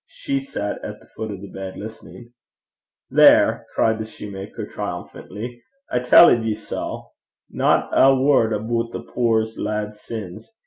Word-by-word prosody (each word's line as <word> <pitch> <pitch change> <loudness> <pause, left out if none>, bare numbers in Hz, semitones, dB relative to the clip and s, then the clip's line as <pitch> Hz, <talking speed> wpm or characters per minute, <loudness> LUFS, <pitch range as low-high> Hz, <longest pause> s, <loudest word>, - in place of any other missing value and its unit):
She 280 - -3
sat 270 - -5
at - - -7
the - - -20
foot 110 - -5
of 100 -2 -7
the 100 - -8
bed 95 -1 -8
listening. 110 +2 -10 0.8
'There!' - - +5
cried 110 0 +2
the 110 - -3
soutar, 100 -2 -8
triumphantly, 120 +3 -7 0.3
'I 125 - +1
telled 125 -1 +7
ye 110 -1 -1
sae! 110 - -5 0.5
Not - - +1
ae 135 - +6
word 130 -5 +3
aboot 115 +2 -2
the - - -5
puir 115 -2 +1
lad's 105 0 -3
sins! 105 - -8
110 Hz, 145 wpm, -22 LUFS, 105-120 Hz, 0.8 s, telled